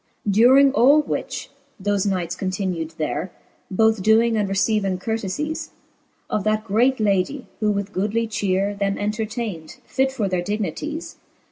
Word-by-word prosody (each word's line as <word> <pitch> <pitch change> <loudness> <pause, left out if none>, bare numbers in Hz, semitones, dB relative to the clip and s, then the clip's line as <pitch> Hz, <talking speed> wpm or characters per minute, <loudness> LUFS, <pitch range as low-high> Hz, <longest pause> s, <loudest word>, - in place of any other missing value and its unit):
V. 205 - +1
During 260 +6 +6
all 285 +3 +5
which, - - -4 0.3
thofe 205 0 0
knights 180 -3 -1
continu'd 185 -4 -3
there, 155 +2 -2 0.4
Both 220 +1 +2
doing 225 +3 +4
and 205 -2 0
receiving 195 -1 +1
curtefies 225 +10 -3 0.6
Of 210 - -1
that 215 0 +1
great 235 +5 +2
ladie, 210 +6 0
who 215 - +1
with 200 0 -2
goodly 215 +4 0
chere 200 -1 0
Them 200 0 -1
entertayn'd, 210 -5 -4
fit 265 0 0
for 220 -6 -1
their 185 -2 0
dignities. 210 - -4
205 Hz, 140 wpm, -22 LUFS, 190-225 Hz, 0.6 s, During